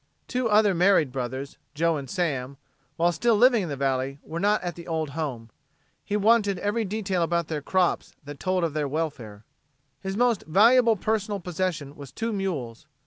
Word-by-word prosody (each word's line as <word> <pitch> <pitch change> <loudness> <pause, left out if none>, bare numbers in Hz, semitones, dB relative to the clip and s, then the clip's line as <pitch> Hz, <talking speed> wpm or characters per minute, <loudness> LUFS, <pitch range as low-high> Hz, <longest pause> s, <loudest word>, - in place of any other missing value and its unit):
Two 250 -2 -1
other 210 -1 +4
married 175 -5 +3
brothers, 130 +2 -5 0.2
Joe 165 +2 +2
and 140 -3 -6
Sam, 140 -8 -2 0.4
while 170 +1 +2
still 230 +7 +2
living 240 +1 +5
in 175 - -4
the 140 - -3
valley, 135 0 -1
were 165 +2 -5
not 205 +3 +2
at 175 -1 -3
the 170 +1 -11
old 160 -3 -2
home. 130 -7 -5 0.5
He 205 - -1
wanted 210 -2 +3
every 205 +5 -1
detail 195 -3 -2
about 170 -1 0
their 155 -2 -2
crops 185 +4 0
that 145 0 -9
told 185 -1 0
of 165 -3 -1
their 150 -2 -1
welfare. 135 -9 -4 0.5
His 195 0 -4
most 240 -4 +2
valuable 230 +7 +5
personal 210 0 -1
possession 175 -5 -3
was 140 -2 -10
two 230 0 -3
mules. 155 - -4
170 Hz, 180 wpm, -26 LUFS, 145-205 Hz, 0.5 s, living